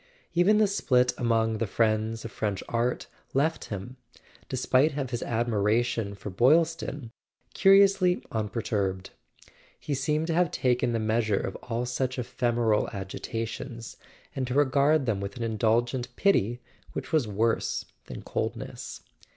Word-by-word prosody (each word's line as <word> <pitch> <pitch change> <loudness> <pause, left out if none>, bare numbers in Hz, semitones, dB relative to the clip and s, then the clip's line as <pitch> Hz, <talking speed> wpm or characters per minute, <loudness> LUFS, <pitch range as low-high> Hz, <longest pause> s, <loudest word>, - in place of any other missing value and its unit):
Even 180 +5 +4
the 215 - +5
split 125 -11 +2
among 115 -2 +1
"The 115 - 0
Friends 110 +1 0
of 115 - -6
French 105 -3 -2
Art" 120 +1 -1 0.3
left 155 +4 +1
him, 105 +5 -7 0.5
despite 130 +3 +2
of 135 -3 -3
his 120 - -2
admiration 115 -1 0
for 100 +1 -7
Boylston, 145 - +2 0.4
curiously 195 -2 +5
unperturbed. 105 -3 -2 0.7
He 145 - -3
seemed 150 +4 0
to 165 - -1
have 175 0 +3
taken 125 -3 +1
the 115 - 0
measure 110 -1 +1
of 95 - -4
all 120 +1 -3
such 130 +1 -2
ephemeral 120 -3 0
agitations, 115 +4 -5 0.4
and 130 -2 -2
to 125 - -3
regard 145 +1 +3
them 105 -5 -1
with 100 +4 -5
an 120 - -3
indulgent 120 +3 0
pity 120 - +2 0.3
which - - -6
was 150 -8 +3
worse 110 +3 0 0.2
than - - -8
coldness. - - -4
120 Hz, 135 wpm, -27 LUFS, 110-140 Hz, 0.7 s, the